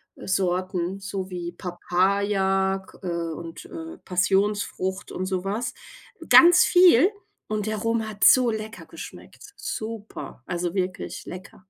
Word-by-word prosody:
Sorten, 185 -1 -1
so 195 -1 -5
wie 175 -1 -5
Papaya, 190 +2 0
G - - -16
und, 170 -1 -5
äh, 330 0 -8
Passionsfrucht 190 0 0
und 185 - -3
so 185 -1 -2
was. 220 +5 -2 0.6
Ganz 350 +1 +8
viel. 360 - +6 0.4
Und 215 0 -2
der 215 - -1
Rum 230 0 -1
hat 205 -2 -4
so 255 -3 +7
lecker 220 0 -5
geschmeckt, 410 - -11
super, 220 - -6
also, 175 0 -2
wirklich 185 -1 -3
lecker. 185 +1 -10
195 Hz, 125 wpm, -25 LUFS, 185-220 Hz, 0.6 s, Ganz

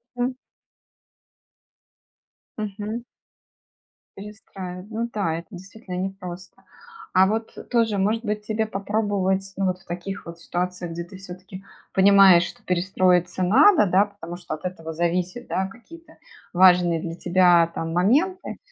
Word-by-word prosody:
М. 245 +1 -2 2.2
Мгм. 215 +2 -5 1.1
Перестраив 195 -3 -9
ну 230 +1 -3
да, 190 -7 -1
это 170 - -7
действительно 190 +1 -9
непросто. 185 -1 -7 0.5
А 185 +1 +6
вот 220 +2 -3 0.2
тоже, 225 -4 +2
может 215 +4 0
быть, 210 0 -3
тебе 220 0 -1
попробовать, 195 -2 -1
ну 195 - 0
вот, 185 -1 -1
в 190 - -23
таких 180 +3 -6
вот 170 0 -9
ситуациях, 180 0 -4
где 170 +1 -5
ты 185 +2 -12
всё-таки 185 0 -11 0.3
понимаешь, 195 -2 +7
что - - -9
перестроиться 180 0 +1
надо, 220 - +5
да, 190 +3 +4
потому 200 -4 -9
что 175 -3 -7
от 155 - -13
этого 165 -3 -5
зависят, 180 +7 -2
да, 190 0 -1
какие-то 325 +11 -15 0.4
важные 180 -2 +5
для 165 0 -5
тебя, 175 -1 +4
там, 165 0 -4
моменты. 295 - +1
190 Hz, 130 wpm, -23 LUFS, 180-210 Hz, 2.2 s, понимаешь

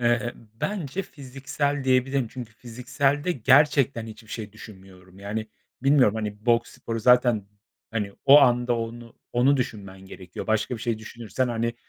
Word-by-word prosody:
eee, 120 -1 +1 0.3
bence 195 -3 -2
fiziksel 140 0 -4
diyebilirim. 130 -1 +2
Çünkü 120 -3 -8
fizikselde 135 +8 -1
gerçekten 135 -2 +3
hiçbir 110 0 -12
şey 110 -3 -6
düşünmüyorum. 95 -3 -14
Yani 110 +2 -4 0.4
bilmiyorum, 135 -6 +4
hani, 105 0 -5
boks 120 0 +2
sporu 115 0 -5
zaten, 120 -3 +4 0.4
hani, 105 -3 -3
o 145 +1 +9
anda 120 -2 +3
onu 115 +1 -7 0.2
onu 135 +4 +4
düşünmen 100 -6 -5
gerekiyor. 95 -1 -9
Başka 110 +3 0
bir - - -11
şey 115 -2 -1
düşünürsen, 115 +2 -3
hani, 115 0 -1
120 Hz, 140 wpm, -25 LUFS, 110-130 Hz, 0.4 s, o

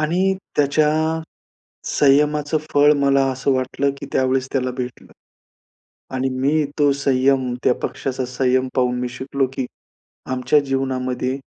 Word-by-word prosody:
आणि 180 +5 +1 0.2
त्याच्या 150 +1 +3 1.0
संयमाचं 150 +2 +2
फळ 145 +1 +6
मला 140 -1 +3
असं 130 +1 0
वाटलं 130 +2 0
की - - -7
त्यावेळेस 130 0 +1
त्याला 130 -2 0
भेटलं 125 -1 -6 1.0
आणि 130 +1 0
मी 140 +4 +1 0.2
तो 145 -1 +4
संयम, 135 -2 +1
त्या 125 - +4
पक्षाचा 130 -1 -3
संयम 130 +1 +1
पाहून 125 -1 +1
मी 125 0 -2
शिकलो 135 +1 -2
की 130 - -2 0.7
आमच्या 130 +3 +3
जीवनामध्ये 130 -1 -1
135 Hz, 125 wpm, -21 LUFS, 130-140 Hz, 1.0 s, फळ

